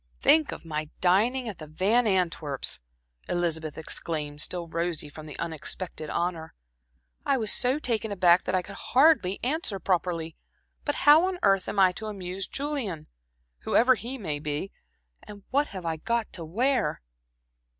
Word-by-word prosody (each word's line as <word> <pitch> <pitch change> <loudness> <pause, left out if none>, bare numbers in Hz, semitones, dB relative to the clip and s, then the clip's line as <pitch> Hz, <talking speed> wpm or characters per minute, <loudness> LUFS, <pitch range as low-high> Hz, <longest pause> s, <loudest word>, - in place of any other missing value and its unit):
"Think 310 -1 +4
of - - -8
my 155 -1 -3
dining 230 +8 +2
at 205 -6 -6
the 155 - -8
Van 205 +10 +2
Antwerps!" 165 - +1 0.5
Elizabeth 160 -3 -1
exclaimed, 150 -2 -3
still 175 +1 -1
rosy 165 -2 -2
from 155 +1 -10
the 150 - -9
unexpected 165 0 -4
honor. 170 -2 -2 0.7
"I 275 - +2
was 220 -4 0
so 255 +3 +2
taken 225 -7 -1
aback 180 -2 +4
that 185 - 0
I 185 - +1
could 200 +1 -10 0.2
hardly 265 - +5
answer 265 - 0
properly. 170 -3 -1 0.5
But 290 - 0
how 305 +5 +8
on 375 -1 -2
earth 195 -1 +3
am - - -4
I 190 -2 +6
to 215 +4 -7
amuse 190 -2 -4
Julian 265 - -3 0.5
whoever 255 +3 +4
he 250 +2 -5
may 155 - -3
be, 150 +6 -3 0.5
and 205 -1 -12
what 285 +3 +2
have 185 -3 -8
I 165 -1 -1
got 230 +6 -2
to 170 - -5
wear?" 245 - 0
185 Hz, 160 wpm, -27 LUFS, 165-235 Hz, 0.7 s, how